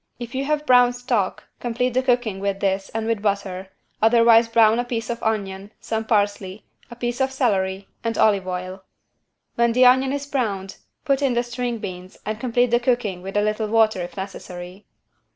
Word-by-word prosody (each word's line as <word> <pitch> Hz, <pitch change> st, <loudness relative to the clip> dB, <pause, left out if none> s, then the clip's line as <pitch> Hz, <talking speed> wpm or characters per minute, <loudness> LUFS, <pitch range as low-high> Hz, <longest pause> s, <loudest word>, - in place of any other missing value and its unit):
If 240 Hz, -1 st, -8 dB
you 265 Hz, +1 st, -2 dB
have 300 Hz, +1 st, -1 dB
brown 245 Hz, -2 st, +5 dB
stock 245 Hz, -6 st, -1 dB, 0.2 s
complete 245 Hz, +1 st, -1 dB
the 255 Hz, -, +2 dB
cooking 245 Hz, -6 st, 0 dB
with 195 Hz, 0 st, -2 dB
this 195 Hz, 0 st, -1 dB
and 225 Hz, 0 st, -3 dB
with 225 Hz, -2 st, -1 dB
butter, 195 Hz, -2 st, -2 dB, 0.3 s
otherwise 230 Hz, +1 st, +5 dB
brown 225 Hz, 0 st, +4 dB
a -, -, +1 dB
piece 240 Hz, -1 st, -3 dB
of 235 Hz, -, -5 dB
onion, 200 Hz, -2 st, -2 dB
some 220 Hz, 0 st, -3 dB
parsley, 205 Hz, -2 st, -1 dB, 0.2 s
a 240 Hz, -, -10 dB
piece 240 Hz, +1 st, -3 dB
of 265 Hz, 0 st, +1 dB
celery 195 Hz, -7 st, 0 dB, 0.2 s
and 230 Hz, -1 st, -2 dB
olive 200 Hz, -3 st, +3 dB
oil. 185 Hz, +1 st, -5 dB, 0.7 s
When 235 Hz, 0 st, +2 dB
the 250 Hz, +1 st, +5 dB
onion 260 Hz, +1 st, +5 dB
is 285 Hz, 0 st, -3 dB
browned 205 Hz, -9 st, -3 dB, 0.3 s
put 275 Hz, -2 st, +1 dB
in 265 Hz, -3 st, +1 dB
the 240 Hz, -, +2 dB
string 240 Hz, 0 st, -3 dB
beans 185 Hz, -3 st, -8 dB
and 215 Hz, +1 st, -3 dB
complete 245 Hz, 0 st, +1 dB
the 240 Hz, -, +4 dB
cooking 240 Hz, -7 st, -1 dB
with 195 Hz, +2 st, -5 dB
a 205 Hz, -, +3 dB
little 215 Hz, +1 st, -1 dB
water 220 Hz, -3 st, +2 dB
if 175 Hz, -, -7 dB
necessary. 185 Hz, 0 st, -8 dB
225 Hz, 190 wpm, -22 LUFS, 195-245 Hz, 0.7 s, brown